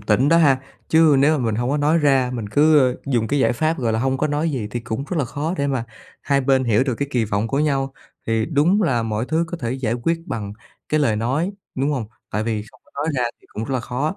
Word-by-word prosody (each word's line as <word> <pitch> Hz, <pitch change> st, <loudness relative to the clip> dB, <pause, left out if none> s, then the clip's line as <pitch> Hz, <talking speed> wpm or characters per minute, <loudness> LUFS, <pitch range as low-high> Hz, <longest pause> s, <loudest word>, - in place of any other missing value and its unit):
tĩnh 120 Hz, +6 st, +2 dB
đó 165 Hz, -, +5 dB
ha. 140 Hz, -6 st, +5 dB, 0.3 s
Chứ 160 Hz, -3 st, +5 dB
nếu 150 Hz, +3 st, +4 dB
mà 125 Hz, -, -2 dB
mình 110 Hz, -2 st, 0 dB
hông 120 Hz, +3 st, -1 dB
có 145 Hz, -, +1 dB
nói 150 Hz, +3 st, +2 dB
ra, 135 Hz, -4 st, +3 dB
mình 115 Hz, -4 st, -4 dB
cứ, 150 Hz, +6 st, +5 dB
ơ, 130 Hz, -3 st, +3 dB
dùng 120 Hz, -5 st, +1 dB
cái 145 Hz, -, +1 dB
giải 130 Hz, -, +3 dB
pháp, 155 Hz, +6 st, 0 dB
gọi 115 Hz, -3 st, 0 dB
là, 110 Hz, -, 0 dB
hông 130 Hz, +2 st, 0 dB
có 150 Hz, -, +1 dB
nói 150 Hz, +2 st, 0 dB
gì 125 Hz, -7 st, -3 dB
thì 120 Hz, -, -3 dB
cũng 115 Hz, +3 st, -4 dB
rất 180 Hz, -, -1 dB
là 145 Hz, -, +1 dB
khó 150 Hz, +7 st, -3 dB
để 140 Hz, -, +1 dB
mà 130 Hz, -4 st, -1 dB, 0.4 s
hai 140 Hz, -1 st, +2 dB
bên 130 Hz, 0 st, +2 dB
hiểu 115 Hz, -1 st, +3 dB
được 130 Hz, -3 st, -1 dB
cái 140 Hz, +4 st, -3 dB
kỳ 120 Hz, -5 st, +1 dB
vọng 105 Hz, +2 st, -1 dB
của 135 Hz, -, -1 dB
nhau. 135 Hz, -3 st, 0 dB, 0.3 s
Thì 115 Hz, -1 st, +1 dB
đúng 165 Hz, +7 st, +2 dB
là 130 Hz, -, +1 dB
mọi 110 Hz, +1 st, -2 dB
thứ 160 Hz, +2 st, +1 dB
có 175 Hz, -, -4 dB
thể 120 Hz, -1 st, -2 dB
giải 125 Hz, -4 st, -1 dB
quyết 165 Hz, +8 st, -1 dB
bằng 105 Hz, -, -4 dB, 0.4 s
cái 155 Hz, -, +1 dB
lời 115 Hz, -7 st, +2 dB
nói, 135 Hz, -, -1 dB, 0.2 s
đúng 135 Hz, +3 st, 0 dB
hông? 130 Hz, -7 st, -2 dB, 0.2 s
Tại 105 Hz, -, -1 dB
vì 110 Hz, -2 st, -1 dB
không -, -, -22 dB
có -, -, -27 dB
nói 155 Hz, -, -1 dB
ra 125 Hz, -, +1 dB, 0.2 s
thì -, -, -24 dB
cũng 110 Hz, -, -5 dB
rất 130 Hz, -, -3 dB
là 125 Hz, -, 0 dB
khó, 135 Hz, +9 st, -3 dB
135 Hz, 280 wpm, -21 LUFS, 115-150 Hz, 0.4 s, đó